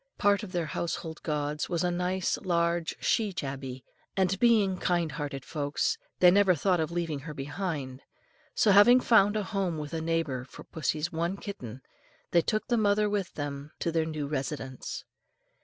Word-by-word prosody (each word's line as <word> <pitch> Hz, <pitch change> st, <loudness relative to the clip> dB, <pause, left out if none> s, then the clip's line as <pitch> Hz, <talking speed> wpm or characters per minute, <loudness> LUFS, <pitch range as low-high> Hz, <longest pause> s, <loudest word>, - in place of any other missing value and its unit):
Part 205 Hz, 0 st, +3 dB
of 210 Hz, -4 st, -7 dB
their 175 Hz, -3 st, -1 dB
household 160 Hz, +1 st, -4 dB
gods 150 Hz, -1 st, -2 dB
was 170 Hz, 0 st, 0 dB
a 180 Hz, -, +1 dB
nice 180 Hz, +1 st, 0 dB
large 170 Hz, -3 st, 0 dB
she 215 Hz, -3 st, +1 dB
tabby, 135 Hz, -5 st, -5 dB, 0.3 s
and 190 Hz, 0 st, +2 dB
being 210 Hz, -6 st, +4 dB
kind 175 Hz, -3 st, +1 dB
hearted 140 Hz, -2 st, -5 dB
folks, 150 Hz, -, -1 dB, 0.2 s
they 180 Hz, -1 st, +8 dB
never 195 Hz, -1 st, +5 dB
thought 180 Hz, +3 st, +2 dB
of 160 Hz, -, 0 dB
leaving 165 Hz, -4 st, -2 dB
her 150 Hz, +2 st, -8 dB
behind; 140 Hz, -3 st, -4 dB, 0.5 s
so 225 Hz, -5 st, +4 dB
having 205 Hz, +6 st, +8 dB
found 215 Hz, -4 st, +4 dB
a 210 Hz, -, 0 dB
home 190 Hz, -4 st, -1 dB
with 150 Hz, +1 st, -6 dB
a 165 Hz, -, -2 dB
neighbour 160 Hz, -6 st, -1 dB
for 130 Hz, -, -12 dB
pussy's 155 Hz, +1 st, -2 dB
one 170 Hz, +4 st, -1 dB
kitten, 130 Hz, -, -8 dB, 0.5 s
they 170 Hz, -, +5 dB
took 215 Hz, +6 st, -1 dB
the 240 Hz, -, +2 dB
mother 210 Hz, -1 st, +3 dB
with 205 Hz, -3 st, -2 dB
them 145 Hz, 0 st, -5 dB
to 170 Hz, -, -1 dB
their 165 Hz, -1 st, +1 dB
new 155 Hz, -2 st, -3 dB
residence. 135 Hz, -2 st, -4 dB
170 Hz, 175 wpm, -29 LUFS, 145-195 Hz, 0.5 s, they